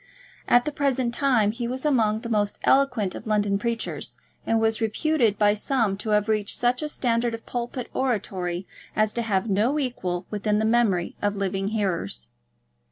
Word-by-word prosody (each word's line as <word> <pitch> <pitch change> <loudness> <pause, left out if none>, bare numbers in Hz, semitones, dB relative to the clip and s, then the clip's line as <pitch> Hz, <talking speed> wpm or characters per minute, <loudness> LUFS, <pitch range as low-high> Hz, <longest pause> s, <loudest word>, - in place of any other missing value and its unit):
At 245 0 +5
the 300 - -1
present 265 -4 0
time 240 -6 +3
he 235 +1 -4
was 255 +3 -4
among 220 -7 +2
the - - -6
most 210 -3 0
eloquent 250 -8 +3
of - - -8
London 205 -2 +1
preachers, 230 +1 -3 0.3
and 225 - +3
was 225 0 +1
reputed 225 -1 +1
by 205 -1 +4
some 215 -1 0
to 210 +2 -5
have 210 0 +2
reached 215 -2 0
such 245 +2 +1
a 305 - -2
standard 235 -4 0
of 230 - -12
pulpit 245 0 -4
oratory 190 -8 -2 0.3
as 215 0 +2
to 235 - -1
have 200 -5 +1
had 225 - -4
no 225 +9 +2
equal 185 -10 -2
within 210 0 0
the 215 - +1
memory 220 -6 +2
of 205 0 0
living 195 0 -1
hearers. 180 - -2
220 Hz, 180 wpm, -25 LUFS, 205-245 Hz, 0.3 s, At